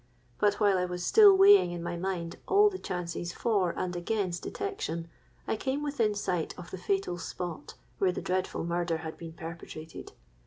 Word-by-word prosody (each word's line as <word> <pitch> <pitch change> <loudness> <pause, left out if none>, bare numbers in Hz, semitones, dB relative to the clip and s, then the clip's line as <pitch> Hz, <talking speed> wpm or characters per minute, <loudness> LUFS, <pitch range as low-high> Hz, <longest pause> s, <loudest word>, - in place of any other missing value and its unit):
But 205 -1 +3
while 205 -3 +3
I 180 - +1
was 180 0 -4
still 410 -3 +7
weighing 395 - +7
in 175 -1 -5
my 175 0 -3
mind 170 -1 -3
all 415 +1 +5
the 375 - -6
chances 175 -1 -4
for 205 -6 +1
and 180 -1 -2
against 175 -1 -2
detection, 170 - -4 0.4
I - - +1
came 265 +6 -2
within 235 -8 0
sight 180 -5 -2
of 180 -1 -10
the 190 - -6
fatal 180 -1 -1
spot 170 -3 -6 0.2
where 190 -2 +3
the - - -4
dreadful 185 0 -2
murder 170 0 -1
had 160 - -5
been 165 -1 -9
perpetrated. 165 -1 -9
180 Hz, 180 wpm, -29 LUFS, 170-210 Hz, 0.4 s, still